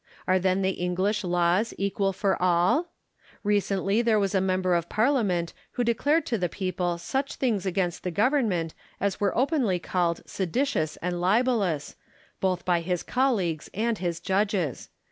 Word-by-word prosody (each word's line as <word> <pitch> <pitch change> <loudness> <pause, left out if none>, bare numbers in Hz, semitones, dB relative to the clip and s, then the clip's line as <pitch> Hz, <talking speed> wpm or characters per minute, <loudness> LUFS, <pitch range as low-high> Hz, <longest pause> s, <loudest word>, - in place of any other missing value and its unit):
Are 185 0 +3
then 185 +1 +1
the 190 - +2
English 185 +4 -1
laws 175 +4 +1
equal 195 0 0
for 195 0 0
all 180 - +3 0.3
% - - -49 0.3
Recently 205 0 +1
there 230 -2 +3
was 195 -1 0
a 190 - +3
member 185 -1 +1
of 170 -1 0
Parliament 215 - +1 0.2
who 245 - 0
declared 285 +8 +2
to 230 -4 -1
the 180 -1 0
people 180 -2 -2
such 265 +11 -2
things 215 -7 0
against 180 -2 -1
the 180 - -1
Govern 240 - +2
ment 165 -4 -2 0.3
as 200 0 -1
were 200 -2 0
openly 260 - +2
called 175 -1 -1
seditious 190 - -1
and 175 0 -2
libellous, 195 - +1 0.4
both 185 -2 0
by 175 -2 +2
his 180 0 -2
colleagues 200 - 0
and 225 +1 0
his 175 -2 -2
judges. 190 - -1
190 Hz, 165 wpm, -26 LUFS, 175-220 Hz, 0.4 s, Are